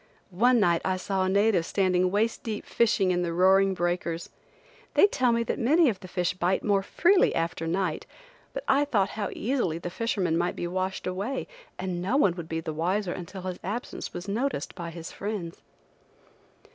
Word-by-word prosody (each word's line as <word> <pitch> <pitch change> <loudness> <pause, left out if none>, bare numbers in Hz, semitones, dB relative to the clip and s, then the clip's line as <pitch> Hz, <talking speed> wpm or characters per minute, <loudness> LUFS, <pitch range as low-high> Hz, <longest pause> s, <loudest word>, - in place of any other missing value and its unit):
One 240 +6 +4
night 170 -5 +3
I 185 0 0
saw 190 0 -1
a - - 0
native 200 -2 +3
standing 185 0 +1
waist 215 +4 0
deep 215 -2 -4
fishing 215 -5 +2
in 175 0 +1
the 170 -1 -1
roaring 190 +2 +4
breakers. 175 -1 -2 0.7
They - - +7
tell 255 -11 +2
me 235 0 +2
that - - -3
many 305 +5 +4
of 200 -5 -3
the 185 - -10
fish 180 -1 -1
bite 180 +1 0
more 200 -2 +2
freely 360 - +3
after 165 0 -2
night, 175 -1 -1 0.4
but - - -5
I 280 +2 +4
thought 205 -9 +1
how 205 -2 -3
easily 235 - -1
the 175 +1 -6
fisherman 185 -6 0
might 175 +1 0
be - - -3
washed 185 +2 -2
away, 200 +9 -3 0.3
and 180 -2 -3
no 210 +9 +1
one 200 -11 +4
would 170 -2 -7
be 160 0 -2
the 160 -1 -4
wiser 180 +4 -1
until 185 +1 -8
his 185 -1 -4
absence 215 +7 -4
was 175 +3 -7
noticed 225 - -2
by 170 -2 -6
his 165 -1 -8
friends. 200 -5 -5
190 Hz, 190 wpm, -27 LUFS, 175-220 Hz, 0.7 s, They